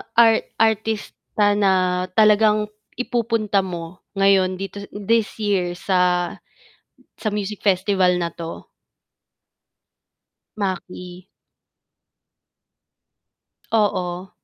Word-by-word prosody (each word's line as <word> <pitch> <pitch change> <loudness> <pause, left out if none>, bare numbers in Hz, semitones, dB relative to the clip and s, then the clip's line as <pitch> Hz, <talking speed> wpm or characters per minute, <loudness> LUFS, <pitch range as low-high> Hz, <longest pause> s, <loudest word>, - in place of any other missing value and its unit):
art 225 -1 +5
artista 220 -1 0
na 185 -2 +2
talagang 215 0 +4 0.2
ipupunta 230 -4 0
mo 175 -1 -5 0.2
ngayon 195 -1 +3
dito, 195 +1 -6 0.2
this 220 +2 0
year 185 -4 0
sa 180 -1 +1 0.9
sa 215 - -3
music 210 -1 -3
festival 190 -2 +2
na 170 -2 -2
'to? 165 0 -8 1.9
Maki. 185 -2 -5 2.5
Oo. 185 -4 0
195 Hz, 75 wpm, -21 LUFS, 180-210 Hz, 2.5 s, art